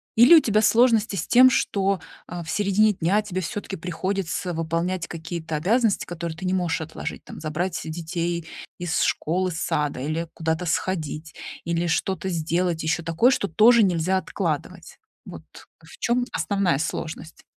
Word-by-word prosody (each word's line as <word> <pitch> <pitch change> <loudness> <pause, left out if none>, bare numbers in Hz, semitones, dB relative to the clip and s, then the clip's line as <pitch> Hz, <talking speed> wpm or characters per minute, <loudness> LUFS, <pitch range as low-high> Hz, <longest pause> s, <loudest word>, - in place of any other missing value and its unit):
Или 245 +9 +8
у - - +9
тебя 215 -4 +2
сложности 225 -2 +3
с 165 - -3
тем, 255 +1 +7
что, 195 -5 +1 0.3
а, 175 0 -6
в 160 - -10
середине 205 +3 +3
дня 190 +4 +1
тебе 185 -3 -3
всё-таки 195 +2 -5
приходится 180 +1 -3
выполнять 165 +2 -2
какие-то 165 -1 -5
обязанности, 210 +7 +1
которые 170 -2 -5
ты 185 - -6
не 185 - 0
можешь 175 -3 0
отложить, 160 0 -6
там, - - -10
забрать 165 +3 -2
детей 170 +1 -3 0.3
из 175 -2 -1
школы, 185 +3 0
сада 150 -4 -1
или 155 +4 -2
куда-то 160 +2 -2
сходить, 160 -3 -2 0.3
или 170 +1 0
что-то 190 +3 -1
сделать, 170 0 -1
ещё 170 +3 0
такое, 165 +11 +3
что 200 - 0
тоже 225 +7 +6
нельзя 185 0 +1
откладывать. 185 - -4 0.3
Вот - - -10 0.4
в - - -15
чём 245 +1 +1
основная 195 -7 +1
сложность? 160 +1 -5
175 Hz, 155 wpm, -24 LUFS, 160-195 Hz, 0.4 s, у